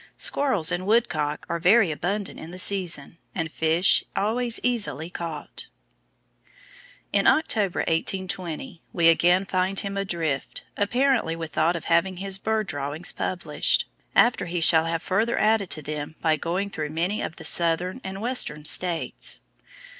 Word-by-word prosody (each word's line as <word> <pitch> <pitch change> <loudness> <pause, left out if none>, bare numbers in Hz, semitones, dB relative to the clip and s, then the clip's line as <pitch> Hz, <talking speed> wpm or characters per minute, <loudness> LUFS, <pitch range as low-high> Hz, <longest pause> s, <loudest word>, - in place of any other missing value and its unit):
Squirrels 230 - +1
and 180 +2 -2
Woodcock 205 -10 0
are 170 - -2
very 190 +1 +4
abundant 195 +6 -3
in 160 - -9
the 180 - -9
season, 180 -5 0 0.2
and 165 -3 -3
fish 160 +4 +3
always 230 +3 +1
easily 205 - 0
caught." 165 -4 -6 1.5
In - - +3
October, 215 - +2
1820, 180 - -3
we 170 -2 +3
again 175 +3 +3
find 190 0 0
him 200 0 -5
adrift, 165 -8 -3
apparently 235 -4 +1
with 165 -1 -6
thought 165 +4 +1
of 170 - -6
having 170 +2 +1
his 195 +1 -2
bird 220 +1 -1
drawings 145 +1 -1
published, 180 -1 0 0.3
after 240 -6 +3
he 175 +1 -2
shall 160 0 +5
have 165 0 -2
further 220 +5 0
added 215 -3 +2
to 155 - -4
them 150 +1 -5
by 160 -1 +2
going 180 +6 -3
through 155 -4 -4
many 170 +7 -1
of 160 - -5
the - - -9
southern 175 +7 +2
and 190 +1 -6
western 215 -11 0
states. 170 +1 0
180 Hz, 145 wpm, -25 LUFS, 160-200 Hz, 1.5 s, shall